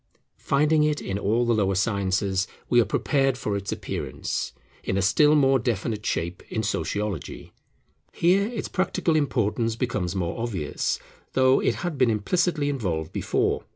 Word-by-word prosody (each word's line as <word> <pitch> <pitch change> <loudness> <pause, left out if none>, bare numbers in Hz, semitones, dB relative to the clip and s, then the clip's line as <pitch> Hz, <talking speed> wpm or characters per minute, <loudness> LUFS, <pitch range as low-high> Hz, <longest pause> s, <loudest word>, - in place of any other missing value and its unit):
Finding 150 +2 +3
it 150 -1 +1
in 95 +1 -3
all 115 +4 +1
the 120 - +2
lower 100 -3 +1
sciences, 95 -1 0 0.2
we 120 -1 +6
are - - +1
prepared 135 +5 +1
for 105 -5 -2
its 100 0 -3
appearance - - -3 0.3
in 95 - -1
a - - +2
still 150 +11 +5
more 135 -2 +4
definite 110 -2 -2
shape 85 -2 -2
in 110 - -1
Sociology. 100 0 -3 0.6
Here 190 +4 +3
its 230 -3 -4
practical 185 -3 0
importance 115 -6 0
becomes 100 -7 -2
more 90 +4 -2
obvious, 100 -11 -2 0.4
though 130 0 +4
it - - +1
had 160 -6 -3
been 130 -2 +4
implicitly 145 - +1
involved 90 - -2
before. - - 0
115 Hz, 155 wpm, -25 LUFS, 100-140 Hz, 0.6 s, we